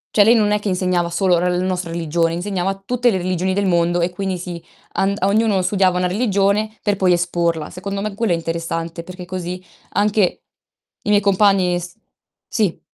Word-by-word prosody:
cioè 210 - +7
lei 230 +3 +6
non 210 -2 +3
è 210 - +2
che 205 - -5
insegnava 180 -2 0
solo 175 0 +2
la 180 - +1
n 180 +1 0
nostra 180 -2 -2
religione, 165 0 0
insegnava 190 +1 -2
tutte 245 +2 +2
le 200 - +1
religioni 185 +1 -1
del 200 0 +1
mondo 175 -1 +2
e 175 +1 0
quindi 190 0 -3
sì, 175 -1 -7 0.3
and 200 +1 0
ognuno 200 -1 +2
studiava 185 -1 +2
una 180 - +1
religione 200 +1 +1
per 205 -2 +1
poi 185 -2 +3
esporla. 170 -2 -1
Secondo 195 +2 -5
me 210 0 -3
quello 215 0 -1
è - - +4
interessante 165 0 -4
perché 180 +1 -9
così, 180 0 -5 0.3
anche 205 -2 +1 0.6
i 210 - -4
miei 205 -1 +5
compagni 195 -3 +3
s 175 0 -9 0.5
sì. 205 -7 0
185 Hz, 190 wpm, -20 LUFS, 175-200 Hz, 0.6 s, cioè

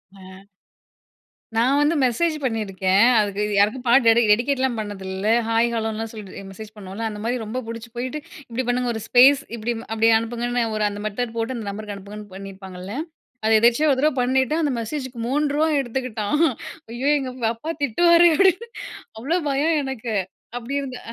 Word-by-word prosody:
ஆ. - - -16 1.4
நான் 250 +5 +3
வந்து 295 +3 +2
மெசேஜ் 260 +7 +1
பண்ணியிருக்கேன். 195 -5 +1 0.2
அதுக்கு 205 -1 0
யாருக்கும் 215 +6 +2
பாட்டு 245 +2 +5
டெடி 230 +1 +6
டெடிகேட்லாம் 255 +2 +1
பண்ணதில்ல 195 -1 -4 0.2
ஹாய் 230 +1 +2
ஹலோன்னுலாம் 225 0 -2
சொல்லி 210 -4 -9
மெசேஜ் 210 +2 -10
பண்ணுவோம்ல, 195 +2 -7
அந்த 210 -1 -7
மாரி 240 +2 0
ரொம்ப 220 +4 -4
புடிச்சு 230 0 -7
போயிட்டு 255 +5 -3 0.3
"இப்டி 240 +2 -2
பண்ணுங்க 245 0 0
ஒரு 220 - -5
ஸ்பேஸ் 265 +4 +6
இப்டி 235 +1 -2 0.2
அப்டி 225 0 +2
அனுப்புங்கன்னு 240 +1 -1
ஒரு 215 - 0
அந்த 205 0 -7
மெத்தட் 225 +2 -3
போட்டு 230 +3 -2
அந்த 225 - -6
நம்பருக்கு 205 0 -6
அனுப்புங்கன்னு." 205 +1 -10
பண்ணியிருப்பாங்கள்ல. 190 0 -8 0.5
அத 220 - +2
எதிர்ச்சயா 240 +7 +4
ஒரு 265 - +2
தடவ 305 +2 +3
பண்ணிட்டு 260 +3 +1
அந்த 295 - +1
மெசேஜுக்கு 260 +1 -5
ரூ.3வா 295 +3 +1
எடுத்துக்கிட்டான் 245 -1 -2 0.5
"ஐயோ 250 +4 -1
எங்க 265 -2 -4 0.2
அப்பா 270 +8 -6
திட்டுவாரே" 340 +6 +5
அப்டின்னு 390 +6 +3 0.5
அவ்ளோ 295 +10 0
பயம் 290 +4 +1
எனக்கு 255 -4 -4 0.5
அப்டி 245 +3 -6
இருந்த. 260 -3 -6
235 Hz, 155 wpm, -22 LUFS, 215-265 Hz, 1.4 s, டெடி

